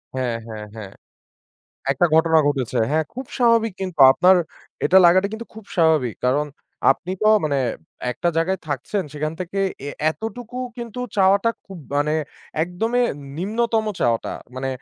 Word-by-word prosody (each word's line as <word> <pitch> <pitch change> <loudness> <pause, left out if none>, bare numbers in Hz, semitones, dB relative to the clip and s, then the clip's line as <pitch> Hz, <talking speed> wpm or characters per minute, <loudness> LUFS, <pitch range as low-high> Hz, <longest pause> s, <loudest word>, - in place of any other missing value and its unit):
হ্যাঁ, 125 -3 -1
হ্যাঁ, 110 -1 -7
হ্যাঁ। 100 -3 -8 1.0
একটা 175 - +3
ঘটনা 160 0 +5
ঘটেছে। 135 -5 0
হ্যাঁ, 155 +1 +2
খুব 260 +2 -6
স্বাভাবিক, 230 -3 +3
কিন্তু 185 -5 -5
আপনার 185 +4 +5 0.5
এটা 190 - +6
লাগাটা 185 +3 +5
কিন্তু 230 +1 -6
খুব 220 -2 -11
স্বাভাবিক। 155 - +3
কারণ, 140 +4 +2 0.4
আপনি 175 +6 -1
তো - - +3 0.2
মানে 145 -2 +1 0.5
একটা 175 - -1
জায়গায় 185 +4 +1
থাকছেন, 145 - -2
সেখান 155 +1 -3
থেকে 185 +2 -4 0.3
এ - - -3 0.2
এতটুকু 235 +5 -7 0.2
কিন্তু 235 0 -7 0.2
চাওয়াটা 200 +4 +4 0.2
খুব 190 -3 -9 0.2
মানে 145 +1 +1 0.5
একদমই 225 +8 0 0.3
নিম্নতম 220 +5 0 0.2
চাওয়াটা। 115 -2 +1 0.2
মানে 135 +1 -2
175 Hz, 140 wpm, -22 LUFS, 145-220 Hz, 1.0 s, এটা